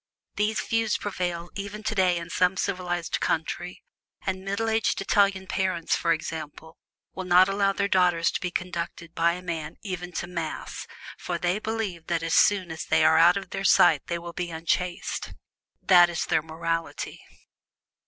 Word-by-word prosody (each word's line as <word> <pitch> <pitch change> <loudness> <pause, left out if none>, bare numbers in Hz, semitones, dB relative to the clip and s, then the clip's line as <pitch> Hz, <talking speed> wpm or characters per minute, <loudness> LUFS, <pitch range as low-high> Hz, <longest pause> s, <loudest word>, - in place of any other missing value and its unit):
This 210 +1 0
view 225 0 0
prevails 175 -4 -3
even 200 +2 -6
today 185 -5 +2
in 170 0 -6
some 180 +1 +2
civilized 180 -3 -2
countries, 175 +2 -2 0.5
and 190 -1 -2
middle 200 +3 -2
aged 225 0 +1
Italian 195 -1 +2
parents, 185 -3 0
for 170 - 0
instance, 160 -2 -3 0.6
will 190 - -5
not 180 +1 +6
allow 195 0 +2
their 200 0 0
daughters 180 -3 +3
to - - -3
be 180 - -1
conducted 170 -2 -5
by 170 +1 +2
a 180 +1 -7
man 160 -3 -4
even 180 -3 -5
to - - -3
Mass, 170 -3 -5 0.3
for 175 - -3
they 175 +4 0
believe 215 -7 -4
that 170 -1 -1
as 165 0 -1
soon 190 -4 +4
as 160 - -5
they - - +3
are 160 0 +5
out 175 +3 +6
of 195 - -7
their 195 - -3
sight 160 -5 +5
they 170 - -1
will 170 0 -8
be 175 0 -3
unchaste. 170 +2 -2 0.5
That 175 -2 +7
is 170 - -2
their - - +2
morality. 165 +1 -4
180 Hz, 170 wpm, -26 LUFS, 170-195 Hz, 0.6 s, That